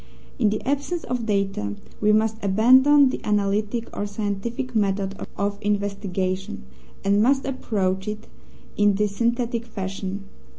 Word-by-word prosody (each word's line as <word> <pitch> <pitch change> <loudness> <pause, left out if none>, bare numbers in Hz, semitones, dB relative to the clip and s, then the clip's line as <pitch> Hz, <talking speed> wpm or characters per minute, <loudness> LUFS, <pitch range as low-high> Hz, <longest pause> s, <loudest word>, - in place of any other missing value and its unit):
In 220 -4 +4
the 215 +3 -3
absence 285 +5 -1
of 240 -2 -3
data 195 - -1 0.3
we 210 0 +4
must 220 +1 +1
abandon 260 +8 +6
the - - -5
analytic 210 +2 0
or 205 - -2
scientific 215 +5 -3
method 195 -2 +1 0.2
of 200 0 -1
investigation, 195 - -2 0.4
and 200 +1 +3
must 270 +4 +3
approach 195 -8 -1
it 210 0 -4 0.5
in 205 -1 +3
the 210 +2 +2
synthetic 235 +3 -1
fashion. 195 -2 -5
210 Hz, 130 wpm, -24 LUFS, 195-235 Hz, 0.5 s, abandon